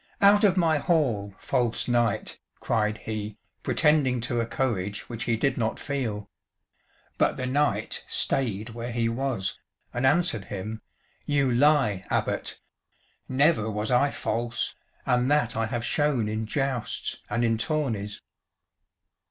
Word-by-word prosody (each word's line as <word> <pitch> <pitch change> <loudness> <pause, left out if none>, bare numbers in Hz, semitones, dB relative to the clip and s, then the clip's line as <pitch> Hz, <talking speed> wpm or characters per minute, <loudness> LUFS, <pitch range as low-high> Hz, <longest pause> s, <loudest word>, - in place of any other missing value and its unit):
"Out 205 +1 +6
of 195 -2 +4
my 160 -4 +3
hall, 120 - +1
false 120 -3 0
knight!" 120 -3 0 0.2
cried 105 -2 0
he, 105 -1 -4 0.2
pretending 150 -5 +3
to 120 +1 -1
a 115 - 0
courage 105 -6 -2
which 115 -1 -5
he 115 -1 +1
did 135 +3 0
not 110 -1 0
feel. 120 -8 -3 0.9
But - - +2
the 130 - -2
knight 145 +3 0
stayed 110 -4 0
where 120 +1 -5
he 115 -1 0
was, 115 -5 -2 0.3
and 125 - -2
answered 130 - +2
him, 105 +3 -5 0.5
"You 140 -3 +2
lie, 125 -7 +3
Abbot. - - -1 0.7
Never 130 -4 +3
was 105 +1 -1
I 135 +3 +4
false, 120 -3 -2 0.3
and 125 +1 +2
that 145 -6 +2
I 115 0 0
have 115 0 -3
shown 145 -7 +1
in 110 +1 -2
jousts 135 -2 -2
and 120 0 +1
in 115 -1 +1
tourneys." 115 -9 -2
120 Hz, 135 wpm, -26 LUFS, 110-140 Hz, 0.9 s, Out